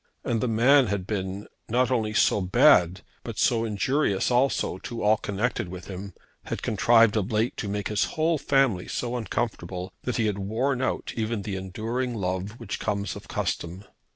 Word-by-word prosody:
And 115 -2 -1
the 125 - 0
man 125 +4 +5
had 100 -2 -2
been, 100 -1 -3 0.2
not 125 +2 +2
only 110 -4 +1
so 105 - +3
bad 90 0 +4 0.2
but 115 -3 -7
so 115 -2 +2
injurious 110 0 0
also, 125 -7 +1
to 115 +3 -6
all 105 +1 +4
connected 105 -1 -2
with 90 0 -8
him, 95 0 -7 0.3
had - - -5
contrived 115 +1 +4
of 105 +2 -1
late 110 +2 +1
to 105 - -3
make 105 0 -2
his 105 -1 +1
whole 160 0 +2
family 135 -11 +2
so 120 0 -3
uncomfortable, 95 -6 -3
that 125 - -2
he 115 - +1
had 105 -2 -1
worn 120 +7 -1
out 130 - -2
even 110 -2 -2
that 100 - -4
enduring 115 +7 -3
love 95 +2 -3
which 115 -5 -5
comes 100 -1 -2
of - - -10
custom. 90 +4 -3
110 Hz, 180 wpm, -26 LUFS, 95-120 Hz, 0.3 s, man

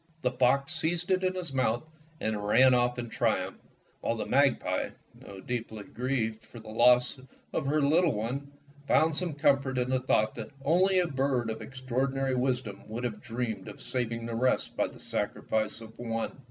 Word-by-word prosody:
The 125 - +2
fox 135 +4 +2
seized 170 +2 0
it 185 0 +2
in 185 0 +1
his 175 -6 -4
mouth 120 -2 +1 0.4
and 110 -1 -2
ran 125 +5 +6
off 125 0 +2
in 120 -1 -3
triumph, - - -1 0.4
while - - -1
the - - -3
magpie, - - +2 0.2
though 95 -1 -11
deeply 110 -3 -4
grieved 115 -2 -2
for 115 - -12
the 110 -1 -10
loss 125 +3 +4 0.3
of 135 - -1
her 150 +1 +2
little 160 +2 +4
one, 125 +7 -3 0.4
found 160 0 +4
some 170 -3 -2
comfort 140 -3 +2
in 125 +1 0
the 130 - +2
thought 110 -4 +2
that 115 -2 -7 0.2
only 185 +5 +4
a 180 - +4
bird 135 -5 0
of 110 - -6
extraordinary 135 +1 -1
wisdom 125 -5 -1
would 115 +3 -5
have 115 -4 -3
dreamed 115 -4 -4
of - - -9
saving 115 -2 -3
the 115 - -4
rest 125 +3 +1
by - - +1
the - - -13
sacri - - -3
fice 110 +1 -1
of 110 0 -12
one. 115 +1 -3
125 Hz, 185 wpm, -29 LUFS, 115-140 Hz, 0.4 s, ran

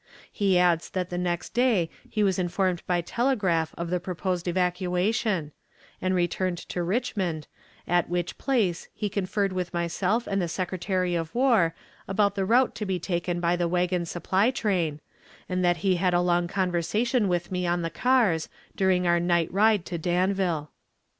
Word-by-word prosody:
He 195 -4 +2
adds 175 -2 +2
that 180 -1 -3
the 175 - -2
next 175 -1 -2
day 235 -8 +3 0.2
he 215 - 0
was 195 -1 +1
informed 180 0 0
by 175 -1 +1
telegraph 190 -7 0
of 170 0 -4
the 180 - +1
proposed 180 0 -3
evacuation, 180 0 0 0.5
and 185 0 +1
returned 175 0 0
to 180 - -2
Richmond, 185 - -1 0.4
at 175 -1 +2
which 175 0 -2
place 215 -11 0
he 210 - -2
conferred 195 0 -1
with 180 -1 -3
myself 180 +7 0
and 195 -1 -1
the 175 - -1
Secretary 180 +1 -1
of 165 +1 -3
War 230 -11 +3 0.3
about 200 +1 +2
the 195 -2 -1
route 245 +5 +3
to 210 - -3
be 190 -1 0
taken 175 0 -2
by 175 0 +2
the 175 -1 0
wagon 180 0 0
supply 190 +6 +1
train, 180 - -1 0.5
and 185 0 -1
that 175 -1 +3
he 185 -2 +3
had 180 0 +1
a 175 - +3
long 175 -1 +2
conversation 195 +6 0
with 175 -1 -1
me 180 -1 -1
on 175 0 0
the 165 - -2
care, 235 -4 +3 0.4
during 185 -2 +2
our 175 0 +3
night 170 -1 +1
ride 210 -2 +3
to 170 - -4
Danville. 175 -2 0
180 Hz, 170 wpm, -26 LUFS, 175-195 Hz, 0.5 s, day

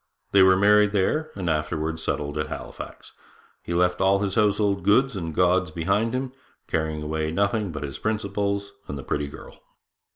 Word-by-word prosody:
They 100 - +6
were 95 0 +6
married 105 +1 +5
there, 150 +11 +1
and 95 -3 -4
afterwards 80 +1 -1
settled 75 -1 -2
at 75 - -1
Halifax. - - -8 0.5
He 85 - -4
left 90 0 +2
all 95 +1 +4
his 100 -1 -2
household 100 -1 +2
goods 125 +4 +3
and 85 -4 -4
gods 90 0 +3
behind 100 +9 0
him, 130 0 -2 0.4
carrying 80 -1 -2
away 80 +1 -2
nothing 100 +3 0
but 75 -2 -5
his 70 -2 -6
principles 100 -1 -2 0.2
and 70 - -5
the 70 - -7
pretty 75 0 -2
girl.' 70 - -12
95 Hz, 170 wpm, -25 LUFS, 80-105 Hz, 0.5 s, They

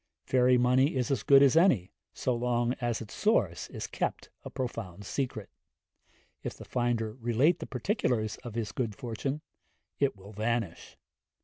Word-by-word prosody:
Fairy 125 -1 +4
money 130 +4 +3
is 130 +2 0
as 130 -6 +1
good 140 +3 +7
as 140 0 +5
any, 165 - +4 0.2
so 125 - -1
long 120 0 +1
as 120 -2 -1
its 110 - -9
source 110 - +1
is - - -5
kept - - -3
a - - -6
profound 105 -7 -5
secret; 115 -4 -3 0.9
if - - -5
the - - -11
finder 120 -3 -1
relate 120 +9 +3
the - - -6
particulars 125 - -1
of 120 -3 -9
his 115 -3 -2
good 115 -5 -2
fortune, 130 +6 -4 0.6
it 140 -4 +2
will 100 +2 -13
vanish. 110 -3 -2
120 Hz, 155 wpm, -30 LUFS, 110-130 Hz, 0.9 s, good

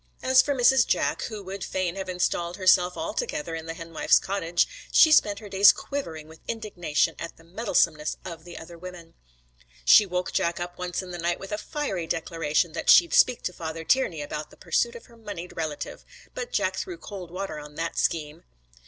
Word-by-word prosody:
As 260 0 +6
for 285 0 -1
Mrs. 255 -1 +5
Jack, - - 0
who 215 -3 -6
would 190 0 -6
fain 185 -2 -2
have 190 -1 -5
installed 180 -1 -1
herself 185 -2 +4
altogether 310 - -3
in 165 0 -5
the 165 - -5
henwife's 165 -1 +2
cottage, 175 -3 0 0.2
she 315 - +7
spent 205 -9 +5
her 210 0 -9
days 195 0 +7
quivering 165 - -6
with 160 0 -14
indignation 190 -9 -1
at 170 - -7
the 165 - -18
meddlesomeness 165 -5 0
of 165 -3 -8
the 175 0 -10
other 170 +1 -10
women. 180 -2 -10 0.7
She 205 - +7
woke 180 0 -2
Jack 170 +1 0
up 175 0 -6
once 180 +1 -3
in 180 - -9
the 175 - -6
night 170 +1 -1
with 195 - -9
a 210 - -1
fiery 200 - -3
declaration 165 -1 -1
that 165 - -3
she'd 345 -2 +7
speak 250 -2 +4
to 180 - -2
Father 160 -1 -6
Tiernay 170 - +1
about 150 +1 -5
the - - -18
pursuit 475 0 0
of 475 - -10
her 235 -2 -19
moneyed 205 -6 -8
relative, 155 -3 -5 0.3
but 485 - -5
Jack - - 0
threw 365 -2 -4
cold 195 - -8
water 180 -3 -5
on 150 0 -11
that 165 +1 -3
scheme. 150 -2 -1
180 Hz, 195 wpm, -26 LUFS, 165-205 Hz, 0.7 s, she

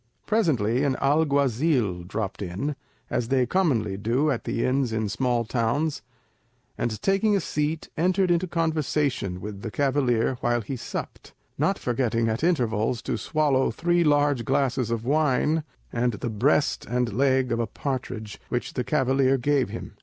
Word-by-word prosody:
Presently 135 - +1
an 140 -2 +1
alguazil 140 - +2
dropped 105 0 -4
in—as 120 +5 -4
they 130 0 +2
commonly 120 - +1
do 125 +9 +1
at 125 - -3
the 115 - -1
inns 130 -1 +1
in 110 -1 -1
small 120 +3 0
towns—and 120 -2 -4
taking 200 +2 +3
a - - +3
seat, 155 -1 -2
entered 185 +2 +2
into 175 +2 +2
conversation 150 - -1
with 100 0 -7
the 115 - -4
cavalier 130 -2 +1
while 120 0 +1
he 115 +5 -5
supped; 120 - -7 0.3
not - - +2
forgetting 115 -2 0
at 110 +6 -2
intervals 120 -8 +1
to - - -1
swallow 145 -4 +1
three 175 +7 +1
large 145 -4 +3
glasses 130 -1 0
of 115 -1 -2
wine, 150 +2 +2 0.3
and 120 0 +1
the 110 +3 -4
breast 105 - +2
and 120 -2 0
leg 130 +1 +2
of 115 - 0
a 115 - 0
partridge, 125 -6 -5
which 120 - -2
the 125 - -1
cavalier 135 -1 +2
gave 140 +1 +1
him. - - -7
130 Hz, 150 wpm, -25 LUFS, 115-150 Hz, 0.3 s, taking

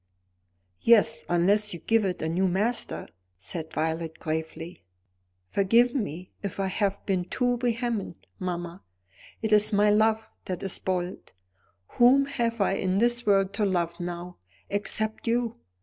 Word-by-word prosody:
"Yes; 230 0 +4
unless 200 +3 +3
you - - -8
give 225 +2 +2
it 180 -3 -2
a - - 0
new 180 +4 +1
master," 210 +7 0 0.3
said 160 - -6
Violet 160 +1 -2
gravely. 160 - -5 0.7
"Forgive 230 +5 +4
me 185 - -4
if 200 -1 -5
I 195 - +1
have 195 +1 -1
been 185 -3 0
too 245 +4 0
vehement, 235 -5 -2
mamma. 175 -1 -4 0.6
It 220 -1 +1
is 210 +1 +4
my 205 0 +4
love 220 +1 +2 0.2
that 185 0 -4
is 195 - -2
bold. 185 -1 -3 0.7
Whom 260 +3 +6
have 235 -4 -2
I 195 - +2
in 185 0 0
this 240 +1 +2
world 195 -1 +3
to 210 - -1
love 170 -4 0
now, 175 0 -6 0.3
except 215 +2 -1
you? 235 0 0
200 Hz, 145 wpm, -27 LUFS, 175-225 Hz, 0.7 s, Whom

